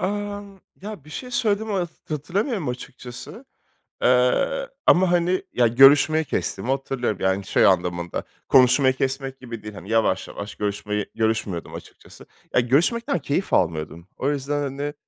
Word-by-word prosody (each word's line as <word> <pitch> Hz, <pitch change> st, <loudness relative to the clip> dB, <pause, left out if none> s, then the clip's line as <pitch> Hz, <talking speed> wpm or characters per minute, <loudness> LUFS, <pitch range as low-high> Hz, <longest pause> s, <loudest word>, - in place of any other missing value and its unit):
Emm, 205 Hz, 0 st, -4 dB, 0.3 s
ya, 205 Hz, -8 st, -8 dB
bir 155 Hz, -, -14 dB
şey 250 Hz, +7 st, -7 dB
söylediğimi 220 Hz, -3 st, 0 dB
hat 175 Hz, -3 st, -1 dB, 0.2 s
hatırlamıyorum 180 Hz, -, -2 dB
açıkçası. 125 Hz, 0 st, -8 dB, 0.6 s
Eee, 125 Hz, -, +2 dB, 0.2 s
ama, 180 Hz, 0 st, +5 dB
hani, 175 Hz, +1 st, +1 dB
ya 120 Hz, -, +3 dB
görüşmeyi 140 Hz, +6 st, +6 dB
kestiğimi 130 Hz, -, -3 dB
hatırlıyorum, 135 Hz, -6 st, -1 dB
yani, 95 Hz, +1 st, 0 dB
şey -, -, +3 dB
anlamında, 90 Hz, -2 st, 0 dB, 0.3 s
konuşmayı 130 Hz, +1 st, +5 dB
kesmek 135 Hz, 0 st, -3 dB
gibi 115 Hz, -4 st, -8 dB
değil, 105 Hz, -1 st, -8 dB
hani, 100 Hz, +1 st, -10 dB
yavaş, 115 Hz, -1 st, +1 dB
yavaş 105 Hz, +1 st, -7 dB
görüşmeyi 105 Hz, 0 st, -3 dB
görüşmüyordum 110 Hz, -6 st, -2 dB
açıkçası. -, -, -13 dB, 0.3 s
Ya, -, -, +5 dB
görüşmekten 175 Hz, -, +1 dB
keyif 145 Hz, +5 st, -2 dB
almıyordum. 85 Hz, +1 st, -1 dB
O 135 Hz, -, -1 dB
yüzden, 145 Hz, 0 st, -2 dB
hani, 145 Hz, +1 st, -4 dB
135 Hz, 140 wpm, -23 LUFS, 110-175 Hz, 0.6 s, görüşmeyi